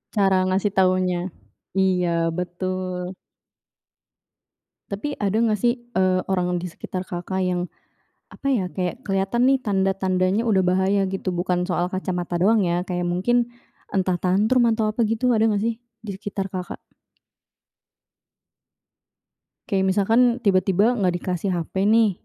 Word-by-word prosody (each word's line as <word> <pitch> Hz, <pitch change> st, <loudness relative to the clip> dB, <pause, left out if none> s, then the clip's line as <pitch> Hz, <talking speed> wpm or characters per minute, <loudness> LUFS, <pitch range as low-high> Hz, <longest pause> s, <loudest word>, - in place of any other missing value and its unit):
Cara 190 Hz, -2 st, +3 dB
ngasih 190 Hz, +2 st, +1 dB
taunya, 185 Hz, -1 st, +3 dB, 0.6 s
iya, 185 Hz, -2 st, +2 dB, 0.3 s
betul. 180 Hz, +1 st, -4 dB, 1.8 s
Tapi 280 Hz, +9 st, -3 dB
ada 205 Hz, +1 st, -1 dB
nggak 215 Hz, -3 st, +2 dB
sih, 240 Hz, +2 st, +3 dB, 0.2 s
eee, 185 Hz, -1 st, +3 dB
orang 180 Hz, -2 st, 0 dB
di 180 Hz, -, -5 dB
sekitar 185 Hz, +2 st, -6 dB
Kakak 180 Hz, +2 st, -4 dB
yang 180 Hz, -1 st, 0 dB, 0.7 s
apa -, -, -7 dB
ya 195 Hz, -8 st, +1 dB
kayak 185 Hz, +7 st, -4 dB
kelihatan 195 Hz, +6 st, +1 dB
nih 270 Hz, -, +5 dB
tanda-tandanya 190 Hz, 0 st, +1 dB
udah 210 Hz, -5 st, +2 dB
bahaya 190 Hz, +2 st, +2 dB
gitu 190 Hz, 0 st, -3 dB
bukan 180 Hz, 0 st, 0 dB
soal 180 Hz, -1 st, 0 dB
kacamata 180 Hz, -2 st, -3 dB
doang 210 Hz, +6 st, +3 dB
ya 175 Hz, +1 st, 0 dB
kayak 180 Hz, -1 st, -2 dB
mungkin, 235 Hz, +7 st, +1 dB, 0.4 s
entah 185 Hz, -2 st, 0 dB
tantrum 215 Hz, +7 st, +3 dB
atau 220 Hz, -1 st, +1 dB
apa 215 Hz, -, -16 dB
gitu 230 Hz, +3 st, +1 dB
ada 225 Hz, -1 st, +3 dB
nggak 205 Hz, -2 st, 0 dB
sih 230 Hz, 0 st, 0 dB, 0.3 s
di 210 Hz, -, -5 dB
sekitar 195 Hz, -1 st, -5 dB
Kakak? 180 Hz, -2 st, -5 dB, 2.9 s
Kayak 190 Hz, -1 st, +1 dB
misalkan, 225 Hz, +4 st, +3 dB, 0.2 s
tiba-tiba 195 Hz, +2 st, +3 dB
nggak 185 Hz, -3 st, +2 dB
dikasih 185 Hz, +1 st, -2 dB
HP 190 Hz, +4 st, -1 dB
nih 220 Hz, -1 st, +4 dB
190 Hz, 130 wpm, -23 LUFS, 180-210 Hz, 2.9 s, nih